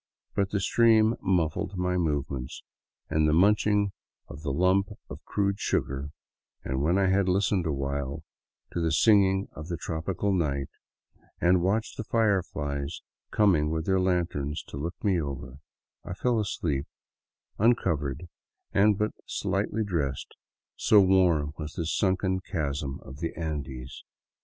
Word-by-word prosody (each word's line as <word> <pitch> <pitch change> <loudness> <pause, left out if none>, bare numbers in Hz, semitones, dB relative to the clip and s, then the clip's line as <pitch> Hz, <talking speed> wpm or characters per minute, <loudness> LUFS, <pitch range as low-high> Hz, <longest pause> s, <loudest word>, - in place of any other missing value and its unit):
But 100 -1 0
the 100 - 0
stream 110 +2 +4
muffled 90 0 0
my 90 0 0
movements 70 -6 -2 0.4
and 80 0 +2
the - - +2
munching 105 +3 +3 0.4
of 70 - -10
the 75 -3 -2
lump 95 +6 +3 0.2
of - - -8
crude 100 -1 0
sugar, 70 +2 -1 0.5
and 65 +1 -2
when 85 +6 +2
I 100 - +3
had 95 -1 +2
listened 95 -1 +1
awhile 70 0 -3 0.5
to - - -2
the 80 -1 +1
singing 95 +2 +4
of 75 +1 -9
the 85 -2 -3
tropical 90 +6 -2
night, 70 -6 0 0.7
and 90 +1 +4
watched 105 +5 0
the - - -3
fireflies 85 -11 -1 0.3
coming 90 -8 +3
with 80 0 -2
their 95 -1 +2
lanterns 85 -5 -1
to - - -7
look 85 +5 -4
me 95 -5 +2
over, 70 -2 -6 0.4
I 90 - -6
fell 120 +2 +1
asleep, 75 -9 -2 0.7
uncovered 85 - +1 0.5
and 105 0 +4
but 105 +1 0 0.2
slightly 110 +1 -1
dressed, 75 -10 -2 0.4
so 105 - +5
warm 90 -6 +3
was 75 -1 -6
this 85 -1 -2
sunken 95 -1 +1
chasm 75 -7 -3
of 65 +1 -11
the 85 0 -3
Andes. 70 -5 -5
85 Hz, 140 wpm, -27 LUFS, 75-100 Hz, 0.7 s, so